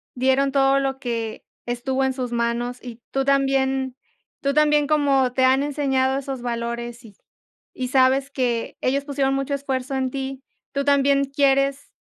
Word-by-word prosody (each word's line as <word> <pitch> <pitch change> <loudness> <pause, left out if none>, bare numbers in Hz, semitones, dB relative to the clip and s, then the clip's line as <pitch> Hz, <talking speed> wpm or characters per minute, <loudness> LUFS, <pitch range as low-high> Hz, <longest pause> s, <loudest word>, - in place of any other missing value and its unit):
dieron 265 +2 +2
todo 275 0 +4
lo 270 -1 -2
que 230 -3 -4 0.2
estuvo 255 +2 -1
en 265 - 0
sus 255 -2 -4
manos, 240 +1 -1
y 240 -1 -10
tú 270 0 0
también 270 -1 +1 0.5
tú 280 0 0
también 300 -1 +3
como 275 -4 +2
te 260 - +1
han 265 +1 +4
enseñado 270 -2 0
esos 270 -2 -5
valores, 235 0 -4
y 210 -3 -15 0.6
y 255 -1 -4
sabes 265 +1 +3
que 240 -4 -2
ellos 275 +2 0
pusieron 275 -2 0
mucho 275 +1 -2
esfuerzo 270 -1 -2
en 260 -1 0
ti, 270 0 -5 0.3
tú 280 0 -1
también 280 0 +3
quieres, 275 0 +1
270 Hz, 160 wpm, -23 LUFS, 250-275 Hz, 0.6 s, todo